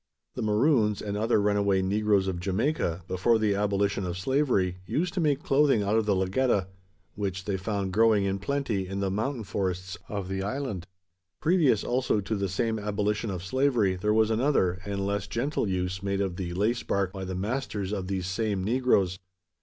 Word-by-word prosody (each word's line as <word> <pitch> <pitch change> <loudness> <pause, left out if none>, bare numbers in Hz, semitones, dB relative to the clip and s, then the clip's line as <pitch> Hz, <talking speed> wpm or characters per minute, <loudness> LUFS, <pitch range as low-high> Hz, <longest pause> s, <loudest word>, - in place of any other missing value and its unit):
The - - -5
Maroons, 110 -1 +2
and 100 -1 -4
other 110 +1 +2
runaway 100 -2 +2
negroes 100 0 +2
of 90 -2 -2
Jamaica, 95 - -1
before 95 +6 +2
the 110 -2 +2
abolition 100 -1 0
of 90 -1 -3
slavery, 100 -5 +1
used 175 - -1
to 190 - -2
make 150 -1 +1
clothing 140 - +3
out 100 +2 +1
of 110 -1 +1
the 100 - +3
lagetta; 95 +1 +1 0.4
which 95 -2 -3
they 100 - -1
found 95 -1 -2
growing 110 -1 +4
in 100 0 -1
plenty 115 -5 -1
in 95 +1 -4
the 100 -1 0
mountain 115 +4 -2
forests 95 0 -3
of 100 -3 -3
the 95 0 -3
island. 105 -4 -3 0.5
Previous 160 - +3
also 125 -3 +1
to 105 +2 -2
the 100 -1 -1
same 110 +4 -1
abolition 105 +1 -1
of 90 -3 -4
slavery, 115 -3 +2
there 105 +3 0
was 110 0 +3
another, 110 -7 +2
and 100 -1 -2
less 100 0 -1
gentle, 120 +2 -1
use 90 0 -2
made 100 0 -1
of 95 -3 -1
the 90 -2 -4
lace 110 +5 +1
bark, 100 -1 -1
by 95 -1 -5
the 95 0 -4
masters 105 -1 -2
of 95 -3 -3
these 95 -1 -2
same 100 +1 -1
negroes. 105 -5 +2
100 Hz, 185 wpm, -27 LUFS, 95-115 Hz, 0.5 s, growing